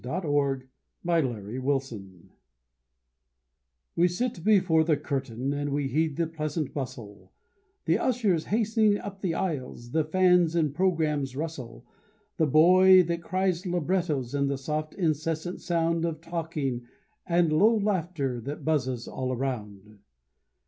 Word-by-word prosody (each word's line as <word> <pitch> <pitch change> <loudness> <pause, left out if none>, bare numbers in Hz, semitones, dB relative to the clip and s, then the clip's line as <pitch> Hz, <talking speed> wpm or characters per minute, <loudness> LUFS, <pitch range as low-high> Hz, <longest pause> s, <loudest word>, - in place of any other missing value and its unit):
THE 125 - -6
RISING 145 -5 0 0.4
OF 135 - +1
THE 115 +6 -5
CURTAIN 120 -10 -4 1.6
We 175 - +4
sit 180 0 -3
before 185 -6 +4
the 155 -2 +2
curtain, 135 -2 -3
and 145 0 -2
we 140 -1 -1
heed 155 0 0
the 170 - +1
pleasant 155 -1 -4
bustle: 105 -8 -7 0.5
The - - +2
ushers 215 -10 +1
hastening 215 -1 +2
up 195 -1 -8
the 175 -4 -1
aisles, 130 -8 -4
the 160 +2 +2
fans' 180 0 +3
and 155 -4 +1
programmes' 150 -6 0
rustle; 135 -6 -6 0.5
The 160 - +2
boy 185 +5 +7
that 170 0 -2
cries 185 +1 -1
librettos, 170 -7 -1
and 140 -1 +1
the 140 - -1
soft, 155 +3 -4
incessant 165 0 -2
sound 165 -1 0
Of 165 -2 -2
talking 160 -7 -4 0.4
and 170 -2 +2
low 215 +8 +4
laughter 170 - -1
that 140 +6 -6
buzzes 130 -6 -1
all 130 0 -3
around. 105 -6 -5
155 Hz, 135 wpm, -27 LUFS, 135-175 Hz, 1.6 s, boy